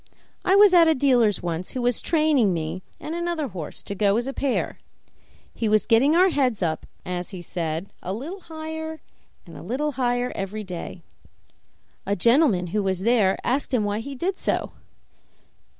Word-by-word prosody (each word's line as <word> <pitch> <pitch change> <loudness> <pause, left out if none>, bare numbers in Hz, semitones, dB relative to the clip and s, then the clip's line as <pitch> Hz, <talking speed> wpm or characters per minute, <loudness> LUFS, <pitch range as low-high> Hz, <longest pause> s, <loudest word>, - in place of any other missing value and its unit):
I 380 - +3
was 405 -1 +7
at 340 -2 +7
a 320 - +4
dealer's 245 -8 +3
once, 170 +1 -3
who 255 - -3
was 245 -2 +2
training 305 - +3
me 160 +3 -4 0.2
and 310 - -6
another 340 -4 -2
horse 175 -6 -7
to - - -5
go 200 +1 +2
as 240 - -1
a 270 - -4
pair; 270 -2 -1 0.7
he 225 - -1
was 215 0 +3
getting 255 +7 +4
our 370 +2 +5
heads 255 - +1
up, 160 -2 -2 0.2
as 180 0 -4
he 185 -3 -8
said, 165 +1 -4
a 180 - -4
little 290 - -5
higher 320 -1 -6 0.5
and 170 - -13
a - - -9
little 265 - -2
higher 245 -1 0
every 200 +2 -4
day. 180 -2 -7 1.0
A 200 - +1
gentleman 230 - +3
who 210 - +2
was 190 -2 -1
there 215 -3 +3
asked 265 +1 0
him 225 - +2
why 205 +1 -1
he 275 +4 -6
did 370 +8 -2
so. - - -1
240 Hz, 180 wpm, -24 LUFS, 190-300 Hz, 1.0 s, was